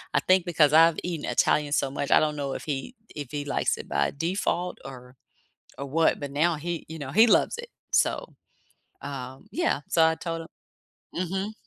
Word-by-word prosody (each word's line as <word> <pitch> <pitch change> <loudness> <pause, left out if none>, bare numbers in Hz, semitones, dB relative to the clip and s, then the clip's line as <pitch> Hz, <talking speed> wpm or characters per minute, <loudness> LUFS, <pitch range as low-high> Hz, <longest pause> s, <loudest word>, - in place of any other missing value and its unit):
I - - +4
think 185 -1 +3
because 155 -4 +3
I've 165 +1 +6
eaten 170 -4 -3
Italian 150 -1 +2
so 135 - +1
much, 140 - -3
I - - +7
don't 150 -1 0
know 140 -2 -3
if - - -6
he 150 - -4 0.2
if 145 -4 -6
he 145 -1 -4
likes - - 0
it - - -9
by 70 0 +1
default 180 +1 -1
or 125 -1 -11 0.6
or 140 - -4
what, 160 +3 +2
but 140 -1 -5
now 160 +4 +2
he, 170 +2 -4
you 160 -1 -8
know, 135 -1 -5
he 220 +8 +6
loves 465 - +3
it. 480 0 -7 0.2
So, - - +1 0.7
um, 135 +4 -7
yeah. 330 - 0
So 165 -1 +4
I 160 0 +2
told 165 -1 -4
him - - -12 0.7
Mhm. 190 +4 -2
160 Hz, 195 wpm, -26 LUFS, 140-175 Hz, 0.7 s, I